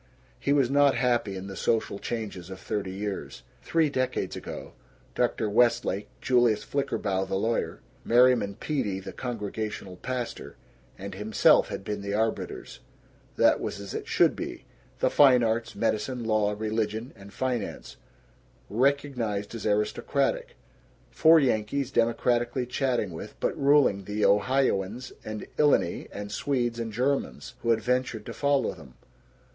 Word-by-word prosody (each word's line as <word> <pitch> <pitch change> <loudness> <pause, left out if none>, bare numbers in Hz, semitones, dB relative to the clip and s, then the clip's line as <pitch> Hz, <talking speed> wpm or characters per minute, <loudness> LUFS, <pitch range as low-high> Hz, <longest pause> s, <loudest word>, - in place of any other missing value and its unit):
He 140 - 0
was 135 -3 +3
not 140 -1 +5
happy 120 -5 +1
in 95 - -6
the 95 0 -7
social 110 -2 0
changes 100 -6 -5
of 95 0 -8
thirty 105 -2 -3
years. 100 +1 -5 0.2
Three 165 -2 +2
decades 130 -3 -1
ago, - - -8 0.4
Dr. - - 0
Westlake, 105 -2 +2
Julius 120 -4 +3
Flickerbaugh 100 -8 -1
the 95 - -2
lawyer, 115 +4 -1 0.2
Merriman 120 -4 +4
Peedy 105 -11 -2
the 95 - -8
Congregational 105 -5 -5
pastor 125 +2 -5 0.4
and 100 0 -7
himself 105 +2 +4
had - - -6
been 105 0 -4
the 100 0 -3
arbiters. 110 - -2 0.6
That - - +4
was - - -4
as 100 -1 -7
it - - -5
should - - +3
be; - - -6 0.3
the - - +1
fine 130 -4 +6
arts 115 +1 -1
medicine, 115 +3 -1
law, 105 -2 +1
religion, 110 +2 -2
and 100 -1 -13
finance 125 -2 -3 0.7
recognized 120 -5 0
as 115 -1 -4
aristocratic; 475 - 0 0.6
four 160 0 +6
Yankees 130 +1 0
democratically 120 +1 +1
chatting 125 -5 -1
with 80 - -9
but - - 0
ruling 140 -9 +3
the 105 +1 0
Ohioans 115 0 +1
and 110 0 -6
Illini 150 -1 +2
and 100 0 -6
Swedes 120 0 -1
and 115 -1 -3
Germans 130 +5 -1
who 115 - -2
had 115 -1 +3
ventured 125 -3 -1
to - - -6
follow 140 -1 +1
them. 65 -3 -14
115 Hz, 140 wpm, -27 LUFS, 105-130 Hz, 0.7 s, fine